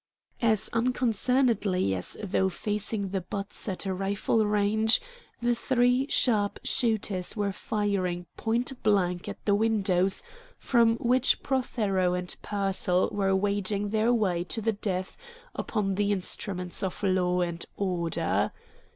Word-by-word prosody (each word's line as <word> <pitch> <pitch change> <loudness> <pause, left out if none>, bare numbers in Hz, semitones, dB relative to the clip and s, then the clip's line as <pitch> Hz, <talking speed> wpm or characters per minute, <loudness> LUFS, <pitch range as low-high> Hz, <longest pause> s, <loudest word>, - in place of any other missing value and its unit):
As 220 -3 +3
unconcernedly 230 - +1
as 90 -1 -2
though 190 -1 +1
facing 205 +1 -3
the 190 0 -2
butts 200 +4 -5
at 190 +1 -3
a 190 - -1
rifle 195 +3 0
range, 210 +2 +4 0.4
the 240 0 +3
three 250 +2 +2
sharp 210 -5 +2
shooters 215 -6 0
were 205 -1 0
firing 190 -4 -2
point 240 +3 -2
blank 180 -4 +1
at - - -9
the 205 - +3
windows 195 -3 +2 0.3
from 230 -2 +3
which 250 +2 +3
Prothero 205 -9 0
and 180 0 -4
Pearsall 195 -3 0
were 195 -1 +1
waging 205 +1 0
their 220 +2 +2
war 190 -7 +1
to 225 - -3
the 225 +1 0
death 190 -2 -3 0.4
upon 205 -3 -1
the 205 +1 +1
instruments 180 -1 -3
of 190 +1 -4
law 180 -2 +2
and 170 -1 -2
order. 175 -4 0
205 Hz, 130 wpm, -28 LUFS, 185-225 Hz, 0.4 s, range